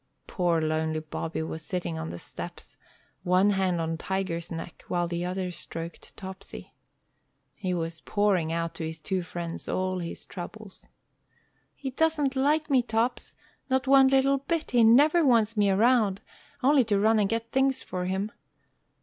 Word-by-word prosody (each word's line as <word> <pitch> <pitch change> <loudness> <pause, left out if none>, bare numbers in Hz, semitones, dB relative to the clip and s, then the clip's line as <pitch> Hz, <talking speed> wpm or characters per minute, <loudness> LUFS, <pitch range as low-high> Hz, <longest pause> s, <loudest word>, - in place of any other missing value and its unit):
Poor, 175 -3 +1
lonely 155 0 0
Bobby 160 +1 -4
was 160 0 -5
sitting 150 - -3
on 80 0 -4
the 85 - -6
steps, - - -8 0.5
one 185 +3 +3
hand 190 -3 +1
on 165 0 -2
Tiger's 185 -2 -3
neck, 165 +1 -7
while 175 -1 0
the 170 0 -3
other 180 0 -2
stroked 165 -1 -7
Topsy. 190 0 -9 0.8
He 185 -3 -3
was 165 -1 -4
pouring 195 -6 +1
out 165 0 -2
to 165 - -6
his 160 0 -4
two 185 +4 -2
friends 170 -1 -6
all 185 0 -1
his 170 -1 -6
troubles. 200 +2 -9 0.9
"He 270 -2 -5
doesn't 295 -1 +1
like 295 +3 +2
me, 270 -4 +4
Tops, 230 +1 -1 0.3
not 260 +1 +1
one 270 0 +7
little 270 +1 +3
bit. 320 +3 -2
He 240 -2 +5
never 290 +9 +6
wants 230 -5 +3
me 205 -2 +3
round, 210 -1 +3 0.4
only 275 0 +5
to 205 -3 +2
run 220 +2 +4
and 200 -2 +2
get 230 0 -2
things 265 0 +2
for 180 -1 -4
him. 190 +3 -2
190 Hz, 160 wpm, -27 LUFS, 170-245 Hz, 0.9 s, one